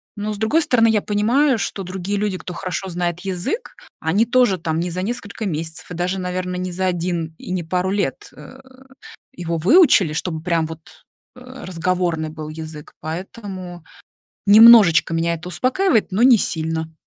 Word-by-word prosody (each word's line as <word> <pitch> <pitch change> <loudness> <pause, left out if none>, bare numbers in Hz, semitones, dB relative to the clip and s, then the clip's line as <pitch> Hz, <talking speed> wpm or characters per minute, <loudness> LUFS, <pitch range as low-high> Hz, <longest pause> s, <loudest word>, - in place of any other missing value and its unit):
Но, 210 0 -4
с - - -5
другой 220 +10 +2
стороны, 250 -7 +3
я 215 -2 +2
понимаю, 235 +7 +2
что 200 -1 -4
другие 190 +2 -4
люди, 205 -2 -1
кто 180 - -8
хорошо 185 +1 -4
знает 175 0 -3
язык, 195 - -4 0.2
они 185 +8 +1
тоже 245 -5 +3
там 160 0 -2
не 175 +1 -2
за 180 +2 -3
несколько 220 0 -5
месяцев 160 -1 -5
и - - -5
даже, 180 +2 -2
наверно, 180 0 -3
не 180 0 -4
за 185 +2 -2
1 175 -2 -2
и - - -10
не 180 -2 -2
пару 180 +3 -1
лет, 195 -8 -2
э, 255 - -13 0.8
его 170 -1 -3
выучили, 200 - +5
чтобы 160 0 -3
прям 165 -2 0
вот, 160 0 -9 0.5
а, 255 0 -11
разговорный 175 -2 -1
был 155 -1 -8
язык. 155 -1 -9
Поэтому 180 +1 -7 0.6
немножечко 205 -7 +7
меня 165 +1 0
это 170 +2 -8
успокаивает, 250 - +1
но 200 +5 +1
не 250 -1 +7
сильно. 160 -2 -2
180 Hz, 170 wpm, -20 LUFS, 165-210 Hz, 0.8 s, немножечко